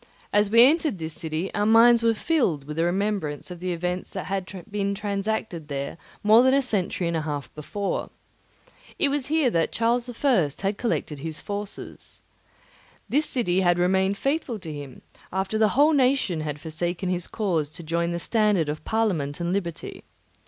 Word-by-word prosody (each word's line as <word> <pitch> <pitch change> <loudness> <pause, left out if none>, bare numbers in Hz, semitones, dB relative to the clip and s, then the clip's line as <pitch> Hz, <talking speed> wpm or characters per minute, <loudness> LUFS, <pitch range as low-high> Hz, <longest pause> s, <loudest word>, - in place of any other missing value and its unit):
As 205 -1 +3
we 230 +2 +8
entered 305 - +3
this 160 -1 -5
city, 160 +3 -4
our 205 +1 +1
minds 230 +1 +6
were 230 -1 +3
filled 215 - +1
with 150 +2 -7
the 165 - +2
remembrance 185 -4 -1
of 175 - -7
the 180 +1 -2
events 180 +1 -3
that 190 - -4
had 190 -1 -3 0.2
been 200 -1 -1
transacted 200 -5 -3
there 140 -1 -4 0.3
more 215 +3 +7
than 260 +1 +4
a 275 - +4
century 190 -6 -1
and 170 - -1
a 160 - 0
half 145 -2 -5
before. 195 +6 -3 0.9
It 280 - +3
was 280 -2 -1
here 300 -4 +2
that 165 -4 +1
Charles 235 +2 +1
I. 240 - +2 0.2
had 195 +1 0
collected 155 - -2
his 155 +1 -5
forces. 205 0 -7 0.9
This 300 +3 +2
city 190 -8 +1
had 175 -1 +3
remained 190 +2 +2
faithful 275 -3 -1
to 165 -6 -7
him, 145 -3 -9 0.3
after 190 +3 -1
the 215 -1 +4
whole 300 +3 +6
nation 260 - +2
had 150 -1 -4
forsaken 175 +4 -3
his 180 -1 -2
cause 170 -9 -1
to 170 +2 -10
join 170 +2 -1
the 170 - -2
standard 205 -4 +1
of 150 +1 -4
Parliament 180 -11 -1
and 170 +1 -1
liberty. 175 -4 -4
190 Hz, 180 wpm, -25 LUFS, 165-225 Hz, 0.9 s, we